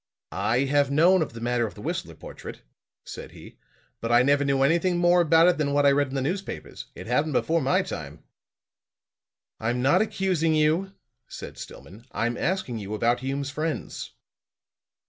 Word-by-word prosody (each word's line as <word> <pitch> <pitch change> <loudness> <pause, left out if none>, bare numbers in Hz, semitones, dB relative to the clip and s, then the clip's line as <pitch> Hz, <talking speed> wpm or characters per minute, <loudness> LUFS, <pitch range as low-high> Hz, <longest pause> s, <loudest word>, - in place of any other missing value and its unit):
"I 120 +3 0
have 140 +1 +2
known 170 +6 +4
of 155 - -3
the 115 - -8
matter 120 -1 0
of - - -11
the - - -11
Whistler - - -4
portrait," - - -10 0.4
said - - -9
he, - - -14 0.4
"but 115 - -3
I 120 +1 +6
never 145 +1 +3
knew 135 -1 +1
anything 170 +5 +2
more 175 0 +4
about 165 +1 +5
it 180 -3 +2
than 140 -2 0
what 145 0 +3
I 140 - +6
read 145 +1 +2
in 130 - -7
the 135 - -1
newspapers. 190 +7 -5
It 90 - -9
happened 145 +6 0
before 165 +5 +1
my 135 0 +2
time." - - -7 1.4
"I'm 120 +3 -1
not 170 +8 +4
accusing 185 -7 0
you," 160 +6 +1 0.3
said - - -9
Stillman. 110 +8 -11
"I'm 120 +2 -1
asking 170 - -2
you 105 +1 -5
about 120 +3 +1
Hume's 135 +2 -3
friends." 155 +1 -4
145 Hz, 175 wpm, -25 LUFS, 125-165 Hz, 1.4 s, I